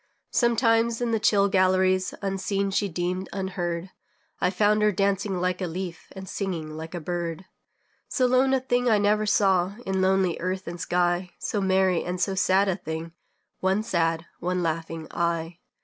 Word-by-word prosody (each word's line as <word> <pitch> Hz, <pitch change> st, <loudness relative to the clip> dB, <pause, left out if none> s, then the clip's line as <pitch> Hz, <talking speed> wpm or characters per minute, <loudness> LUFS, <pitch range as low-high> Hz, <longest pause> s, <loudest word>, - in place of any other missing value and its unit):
Sometimes, 230 Hz, -1 st, +2 dB
in 240 Hz, -1 st, -1 dB
the 225 Hz, -, +1 dB
chill 200 Hz, -1 st, +4 dB
galleries, 185 Hz, -1 st, +2 dB
Unseen, 195 Hz, 0 st, -1 dB
she 200 Hz, +1 st, 0 dB
deemed, 180 Hz, +2 st, -3 dB
unheard, 180 Hz, -2 st, -3 dB, 0.5 s
I 180 Hz, -, +2 dB
found 210 Hz, +3 st, +2 dB
her 210 Hz, 0 st, +4 dB
dancing 195 Hz, -1 st, 0 dB
like 180 Hz, +1 st, -1 dB
a 180 Hz, -, -1 dB
leaf, 175 Hz, +1 st, -6 dB
And 190 Hz, -1 st, -8 dB
singing 175 Hz, -7 st, -4 dB
like 160 Hz, +2 st, -7 dB
a -, -, -3 dB
bird. 175 Hz, +1 st, -4 dB, 0.6 s
So 255 Hz, -, +1 dB
lone 255 Hz, +1 st, +3 dB
a -, -, +2 dB
thing 245 Hz, -1 st, +1 dB
I 220 Hz, -, +5 dB
never 210 Hz, +1 st, +2 dB
saw 195 Hz, -2 st, +3 dB
In 190 Hz, -1 st, 0 dB
lonely 190 Hz, -2 st, +2 dB
earth 185 Hz, +2 st, -3 dB
and 170 Hz, 0 st, -6 dB
sky; 180 Hz, 0 st, +1 dB
So 205 Hz, -, -2 dB
merry 190 Hz, -2 st, +2 dB
and 180 Hz, +1 st, -4 dB
so 195 Hz, +2 st, +1 dB
sad 190 Hz, +1 st, +3 dB
a 190 Hz, -2 st, 0 dB
thing 160 Hz, -1 st, -5 dB, 0.5 s
One 190 Hz, +3 st, +1 dB
sad, 165 Hz, -6 st, 0 dB
one 180 Hz, +1 st, -1 dB
laughing, 165 Hz, 0 st, -3 dB
eye. 170 Hz, 0 st, -2 dB
190 Hz, 170 wpm, -26 LUFS, 175-200 Hz, 0.6 s, I